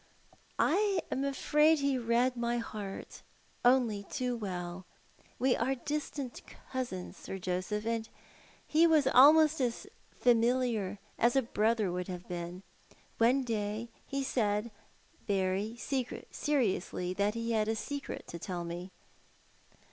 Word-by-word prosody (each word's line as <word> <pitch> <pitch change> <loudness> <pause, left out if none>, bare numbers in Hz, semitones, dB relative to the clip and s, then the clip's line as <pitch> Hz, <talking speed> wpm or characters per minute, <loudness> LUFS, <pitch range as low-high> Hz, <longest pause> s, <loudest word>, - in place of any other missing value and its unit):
"I 395 +4 +3
am 270 - 0
afraid 300 +3 +3
he 280 -1 +1
read 240 +2 +2
my 235 0 0
heart 210 -4 -6 0.4
on 250 0 +5 0.2
' - - -22
too 250 -3 -1
we 215 -4 -4
h 175 0 -5 0.5
We 260 0 +3
are 265 +3 0
distant 285 -1 -4 0.3
cousins. 245 -9 -4
Sir 190 - -6
Joseph, 185 +4 -2
and 230 -1 -1 0.6
he' 325 +2 +4
wlalmost 305 0 +6
asfamiiar 235 -3 0 0.2
as 235 +2 +3
a 270 - +4
brother 220 -3 +1
would 180 0 -3
have 180 -1 -7
been. 175 +1 -5 0.6
One 250 +4 +4
day 220 -1 -2 0.2
hlsaid 235 -5 0 0.6
verv 210 +7 -1
seriously 195 - 0
that 200 +3 0
he 230 0 -2
had 215 -1 +1
a 220 - +1
secret 280 +5 -5
to 170 - -6
tell 175 0 -4
me. 175 +2 -6
230 Hz, 125 wpm, -32 LUFS, 200-265 Hz, 0.6 s, wlalmost